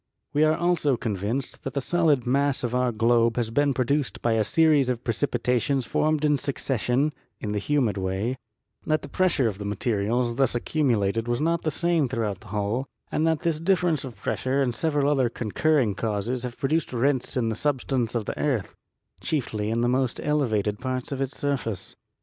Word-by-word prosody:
We 150 - +3
are 155 0 +3
also 170 -6 +2
convinced 115 +3 -3
that 135 - -6
the - - +2
solid 150 -3 +2
mass 140 +2 +1
of 120 -1 -2
our 125 0 +2
globe 115 0 +3
has 115 -2 -1
been 145 +4 +2
produced 135 +2 0
by 120 - +2
a 110 -1 +3
series 150 +1 +3
of 125 -1 -2
precipitations 125 +2 0
formed 155 +3 +1
in 150 -1 +3
succession 135 +1 0 0.3
(in 105 - -4
the 105 - 0
humid 120 -4 +1
way); 95 +7 -2 0.5
that 155 0 +1
the - - -6
pres 185 -1 +1
sure 135 - +2
of 100 -3 -4
the - - -4
materials 115 +3 0
thus 135 -3 +2
accumulated 115 -5 0
was 120 0 0
not 165 +2 +1
the 155 - 0
same 170 -3 +1
throughout 110 -6 -2
the 110 - -15
whole; 105 +6 -2 0.2
and 160 - +1
that 160 -2 +1
this 165 -3 0
difference 170 -4 +1
of 130 -4 -9
pressure 130 +2 -1
and 130 -3 +1
several 145 +2 0
other 135 -4 +2
concurring 120 +2 +1
causes 110 +4 -2
have 125 -1 -5
produced 155 +4 0
rents 130 +1 0
in 115 -3 +1
the 110 - -2
substance 130 -3 -1
of 115 -3 -1
the - - -5
earth, 120 - -1 0.5
chiefly 110 -8 -2
in 115 +1 0
the 120 - +2
most 130 0 0
elevated 110 -9 0
parts 130 0 -3
of 135 -1 -3
its 135 +1 -3
surface. 130 -9 -3
125 Hz, 190 wpm, -25 LUFS, 115-145 Hz, 0.5 s, We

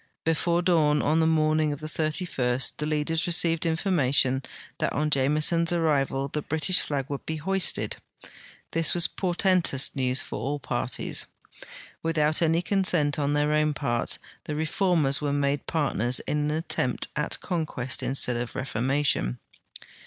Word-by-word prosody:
Befiire 170 +2 +1
dawn 155 -5 +3
on 155 +3 +2
the 160 - +3
morning 155 -1 +2
of 145 - -5
the 155 - -8
31st 155 -6 -1
the 150 - -3
leaders 155 +2 -1
received 165 -1 +3
information 140 -7 +2 0.4
that - - 0
on 150 +1 -1
Jameson's 150 +5 +2
arrival 140 -5 0
the 150 +2 -3
British 160 +4 +1
flag 140 -3 -2
would 140 -1 -5
be 160 - -2
lioisted. 190 +1 +1 0.7
This 165 +1 +3
was 175 - +3
portentous 180 -6 +1
news 130 -1 0
for - - -6
all 140 +6 -2
parties. - - -3 0.7
Without 155 -1 +1
any 165 +1 +2
consent 175 -7 +1
on 145 0 0
their 150 +1 +1
own 150 -1 +1
part, 120 -5 0 0.3
the 150 - -4
reformers 155 -2 +1
were 145 -1 -1
made 140 -1 -1
partners 125 - +1
in 150 0 -1
an 155 +2 -2
atteinjit 125 -6 -1
at 150 +1 -2
conquest 155 - -3
instead 125 -2 0
of 120 0 -5
reformation. 130 - 0
150 Hz, 145 wpm, -26 LUFS, 140-165 Hz, 0.7 s, dawn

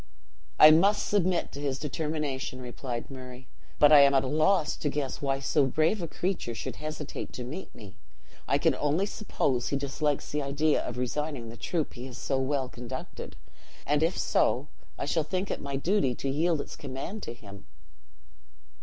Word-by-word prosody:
"I 155 - +10
must 200 +6 +4
submit 185 -3 +1
to 140 - -7
his 140 -2 -1
determination," 150 -3 -3
replied 125 0 -5
Murray; 130 -1 -10 0.3
"but 145 0 +6
I 150 - +10
am 140 0 +6
at 135 - +4
a - - -2
loss 155 +3 +2
to 145 - -1
guess 140 -2 -3
why 135 -1 0
so 140 0 +2
brave 160 +9 +2
a 170 - -2
creature 175 -9 -2
should - - -5
hesitate 155 0 -6
to 125 - -5
meet 150 +10 -7
me. 105 -3 -12 0.5
I - - +3
can - - +3
only 150 +6 +1
suppose 135 - -1
he 140 - 0
dislikes 140 +1 -1
the 150 - -1
idea 145 +2 +1
of 120 - -5
resigning 125 -1 -2
the 115 - -9
troop 155 +7 -2
he 125 +1 -7
has 125 - -9
so 135 -1 -1
well 135 0 0
conducted; 125 +1 -7 0.5
and 145 +1 +2
if 165 +3 +1
so, 140 +4 +1 0.3
I - - -3
shall 160 +3 +1
think 185 +5 -2
it - - -3
my 140 -1 -4
duty 140 -3 +1
to 140 - -4
yield 160 +1 +1
its - - -8
command 140 +10 -6
to 120 - -6
him." 100 - -13
145 Hz, 185 wpm, -29 LUFS, 130-155 Hz, 0.5 s, I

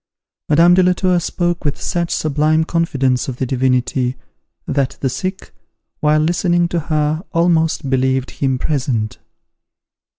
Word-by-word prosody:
Madame 165 +4 +5
de 185 - +5
la 180 0 +4
Tour 180 -1 +1
spoke 175 0 -2
with 145 -2 -2
such 170 -2 -2
sublime 155 +1 +1
confidence 135 -7 0
of 130 -2 -5
the 130 - -1
Divinity, 125 0 0 0.5
that 135 -2 -1
the 135 - 0
sick, 185 +8 -5 0.5
while 150 0 +3
listening 175 +1 +1
to 170 - -1
her, 155 0 -1
almost 165 -3 +1
believed 130 0 0
him 135 -2 -1
present. 125 -7 -2
155 Hz, 135 wpm, -18 LUFS, 130-170 Hz, 0.5 s, Madame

